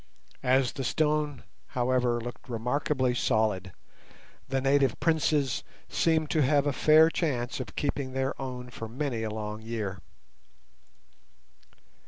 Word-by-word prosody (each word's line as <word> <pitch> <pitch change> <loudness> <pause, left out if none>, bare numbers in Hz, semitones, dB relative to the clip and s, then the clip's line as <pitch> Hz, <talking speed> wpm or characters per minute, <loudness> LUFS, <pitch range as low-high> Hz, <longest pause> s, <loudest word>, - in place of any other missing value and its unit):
As 130 0 +3
the 135 - -5
stone, 150 -2 0 0.3
however, 125 -1 +2
looked 120 +2 -8
remarkably 125 +2 0
solid, 105 -5 +1 0.8
the 135 0 +1
native 135 -2 +2
princes 150 -5 +1 0.3
seemed 160 -2 +1
to 155 - +2
have 145 +1 +3
a 145 - +1
fair 155 +3 +6
chance 130 -9 -1
of 130 - -6
keeping 140 -2 -2
their 135 0 0
own 125 -1 -6
for 115 - -6
many 125 0 -3
a 110 - -2
long 105 0 -5
year. 110 -4 -4
130 Hz, 125 wpm, -28 LUFS, 120-145 Hz, 0.8 s, fair